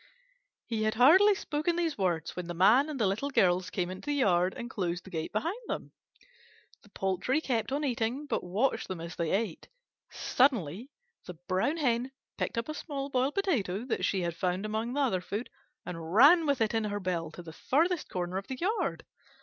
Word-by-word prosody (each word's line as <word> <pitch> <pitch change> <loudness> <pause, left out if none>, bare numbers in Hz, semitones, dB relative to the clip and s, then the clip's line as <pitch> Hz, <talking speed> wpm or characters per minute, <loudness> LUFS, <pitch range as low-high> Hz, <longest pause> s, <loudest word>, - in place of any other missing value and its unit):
He 225 -2 -2
had 215 0 +1
hardly 370 - +7
spoken 310 -1 -1
these 335 -3 0
words 175 -5 -1
when 180 -1 -5
the 175 - -5
Man 230 - +5
and 290 -4 -5
the 215 - +3
Little 205 +9 -1
Girls 185 -7 +2
came 180 -2 -2
into 185 +10 -9
the 290 - +1
yard 185 -8 +2
and 240 -1 -5
closed 180 -7 -3
the 190 - -13
gate 160 -2 -3
behind 335 - -2
them. - - -4 0.9
The 210 - -20
poultry 195 - 0
kept 250 -6 -1
on 285 +2 -1
eating, 250 +1 -1
but - - -2
watched 205 +10 0
them 185 -2 -5
as 170 0 -7
they 165 -2 -1
ate. 200 -2 -2 0.4
Suddenly 235 - +1 0.4
the 180 - -7
Brown 200 - +1
Hen 255 -3 0 0.2
picked - - -3
up 230 - -1
a 310 - -3
small 280 -3 -5
boiled 260 +2 +1
potato 240 - 0
that 255 - -2
she 190 - +1
had 170 -1 -2
found 180 +3 -1
among 220 +3 -2
the 290 - 0
other 225 -10 +1
food, 205 +6 -5 0.3
and 165 -2 -6
ran 310 +7 +7
with 280 -4 +1
it 220 0 +2
in 225 -1 +1
her 205 0 -2
bill 175 -4 -2
to 175 - -9
the 160 -1 -10
farthest 330 - 0
corner 180 0 -3
of 195 - -11
the 260 - -5
yard. 410 - -1
225 Hz, 205 wpm, -30 LUFS, 185-280 Hz, 0.9 s, hardly